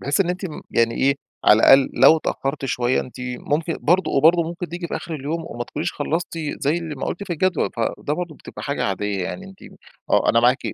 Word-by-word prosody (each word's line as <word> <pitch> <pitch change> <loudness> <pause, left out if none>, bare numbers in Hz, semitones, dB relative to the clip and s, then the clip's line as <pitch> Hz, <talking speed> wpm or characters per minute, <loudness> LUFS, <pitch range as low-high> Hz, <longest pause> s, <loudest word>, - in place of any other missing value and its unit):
بحيث 140 +7 0
إن 185 - +2
أنتِ 180 +2 -4
م 155 - -8
يعني 115 0 +2
إيه، 140 +1 +2 0.3
على 105 - +7
الأقل 135 +2 +6
لو 135 +6 +7
اتأخّرتِ 140 -2 -3
شوية 125 -1 +1
أنتِ 125 - -10
ممكن 145 +6 -2
برضه 180 0 +2
وبرضه 165 +5 +5
ممكن 170 +1 -5
تيجي 175 +1 -5
في - - -2
آخر 165 - -6
اليوم 155 +3 -4
وما 120 -4 -5
تكونيش 155 +7 -4
خلصتِ 165 +3 -3 0.2
زي 150 +5 +1
اللي 165 -3 -6
ما 135 - -4
قُلتِ 200 +4 -4
في 185 - -4
الجدول. 180 +1 0
فده 115 +5 -2
برضه 170 -1 -5
بتبقى - - -11
حاجة 140 0 -2
عادية. 100 -1 -2
يعني 190 - -6
أنتِ 190 0 -15 0.5
آه. - - +3
أنا - - +3
معاكِ - - +4
155 Hz, 220 wpm, -22 LUFS, 130-170 Hz, 0.5 s, على